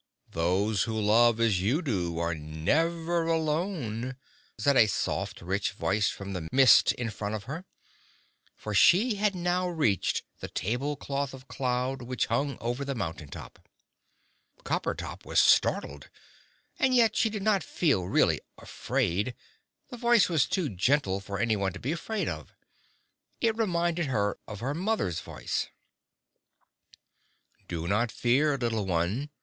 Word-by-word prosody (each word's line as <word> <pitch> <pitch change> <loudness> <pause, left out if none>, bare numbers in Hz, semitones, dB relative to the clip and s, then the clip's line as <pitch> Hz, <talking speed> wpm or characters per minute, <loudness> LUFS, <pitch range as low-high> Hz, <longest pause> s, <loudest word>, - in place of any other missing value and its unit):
"Those 95 +5 +1
who 110 -1 -2
love 115 +2 +4
as 110 -6 +2
you 130 - +1
do 90 - -2
are 85 0 0
never 165 - 0
alone," 155 - -1 0.4
said 140 +6 +2
a 110 - +6
soft 105 - -2
rich 95 +2 -1
voice 100 +1 +1
from 100 0 -6
the 85 -4 -5
mist 130 -1 +6
in 115 -2 -4
front 105 +1 -4
of 105 - -6
her. 155 - -6 0.9
For 105 - -6
she 200 - +5
had 205 -1 +1
now 180 +1 0
reached 145 - 0 0.2
the - - -5
tablecloth 140 +4 -2
of 130 0 -14
cloud 130 0 -2
which 125 +1 -1
hung 135 +3 -1
over 120 +4 -2
the 140 -1 -3
mountain 80 -8 -4
top. 70 - -10 1.0
Coppertop - - -3
was - - +1
startled. 70 0 +2 0.7
And 260 -1 +3
yet 230 -3 +4
she 225 - +2
did 210 -2 -5
not 205 -2 +3
feel 140 - 0
really - - +2 0.2
afraid 105 +8 -2 0.6
the 245 - -6
voice 235 -2 +4
was 160 -6 +2
too 185 -5 0
gentle 100 0 +1
for 100 0 -6
anyone 100 -5 0
to - - -8
be 135 - -2
afraid 205 +5 -3
of. - - -6 0.8
It 225 -2 +1
reminded 175 -6 0
her 105 -6 0
of 105 -2 -8
her 135 +4 -1
mother's 180 - -1
voice. - - -3 2.0
"Do 85 -1 -4
not 110 +4 +1
fear, 140 +4 +2
little 115 -5 -1
one!" 95 - -1
125 Hz, 145 wpm, -28 LUFS, 100-165 Hz, 2.0 s, a